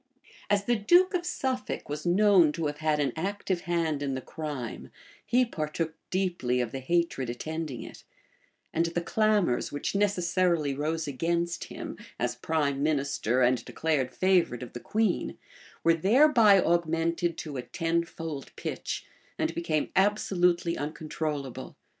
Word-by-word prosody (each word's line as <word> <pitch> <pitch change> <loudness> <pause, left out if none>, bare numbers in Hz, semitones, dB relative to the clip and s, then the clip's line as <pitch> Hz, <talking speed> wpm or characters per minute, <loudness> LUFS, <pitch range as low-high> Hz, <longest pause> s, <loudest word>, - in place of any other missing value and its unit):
As 200 -1 +2
the 240 - +3
duke 350 - +4
of 350 -1 -1
Suffolk 260 -7 -2
was 150 +3 -4
known 185 -3 +5
to 165 - -3
have 145 0 -3
had 155 -1 +1
an 140 -2 0
active 190 +1 -2
hand 165 -4 -1
in 140 -2 -1
the - - -2
crime, 140 -4 -6 0.3
he 250 +1 +3
partook 160 -4 -3 0.2
deeply 175 -10 0
of 120 -2 -1
the 135 - -4
hatred 135 -3 0
attending 155 +1 -4
it; - - -11 0.7
and 165 +1 +2
the 170 +1 -2
clamors 210 - +1
which 145 - -3
necessarily 180 -6 +1
rose 155 +3 -2
against 170 +4 -1
him, - - -7 0.2
as - - 0
prime 145 -4 -1
minister 140 -5 +1
and 125 -1 +3
declared 145 -5 -1
favorite 175 -7 +2
of 125 - -10
the 120 - -5
queen, 215 - 0 0.5
were 165 - +5
thereby 215 - +5
augmented 170 0 +1
to 150 -4 -5
a - - -2
tenfold 165 -2 -3
pitch, - - -4 0.3
and - - 0
became 160 -3 -1
absolutely 180 -3 +2
uncontrollable. 150 -2 -4
165 Hz, 140 wpm, -28 LUFS, 145-185 Hz, 0.7 s, known